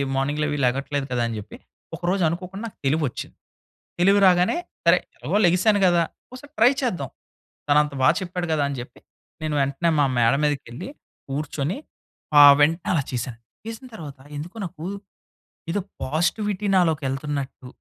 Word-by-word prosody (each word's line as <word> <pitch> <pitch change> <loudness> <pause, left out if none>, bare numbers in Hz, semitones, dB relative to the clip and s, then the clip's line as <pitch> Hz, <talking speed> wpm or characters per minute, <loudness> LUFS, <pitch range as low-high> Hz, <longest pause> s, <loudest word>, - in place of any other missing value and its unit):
మార్నింగ్‌లవి 150 +2 0
లెగట్లేదు 135 +2 -1
కదా 125 -1 0
అని 115 - -4
జెప్పి, 105 +1 -11 0.4
ఒకరోజు 180 +3 0
అనుకోకుండా 185 +5 -6
నాకు 220 - -13
తెలివొచ్చింది. 145 -2 -1 0.6
తెలివి 195 +3 +5
రాగానే, 180 - +4 0.3
సరే 170 +1 +6 0.2
ఎలాగో 185 +7 -1
లెగిసాను 185 +4 +3
గదా! 175 -2 +4 0.3
ఒసారి 280 +3 -11
ట్రై 240 +3 +6
చేద్దాం. 180 - -2 0.6
తనంత 150 0 +3
బా 130 - +6
చెప్పాడు 180 -1 -3
గదా! 155 -2 +2
అని 140 - -4
జెప్పి. 120 0 -10 0.4
నేను 155 -1 -2
వెంటనే 140 +5 0
మా 145 - +5
మేడ 115 0 +4
మీదకి 145 -2 -1
ఎళ్లి 125 - -7 0.4
కూర్చొని 145 - -2 0.6
ఆహ్, 145 -1 +11
వెంటనే 165 +4 +2
అలా 155 -5 +1
చేశాను. 120 -1 -4 0.3
చేసిన 225 +3 -7
తరువాత 150 -9 -8 0.2
ఎందుకో 165 +7 -7
నాకు 160 -2 -9 0.9
ఏదో 205 - 0 0.2
పాజిటివిటీ 185 +8 -1
నాలోకెళ్తున్నట్టు, 145 -5 -1
155 Hz, 140 wpm, -23 LUFS, 140-180 Hz, 0.9 s, ఆహ్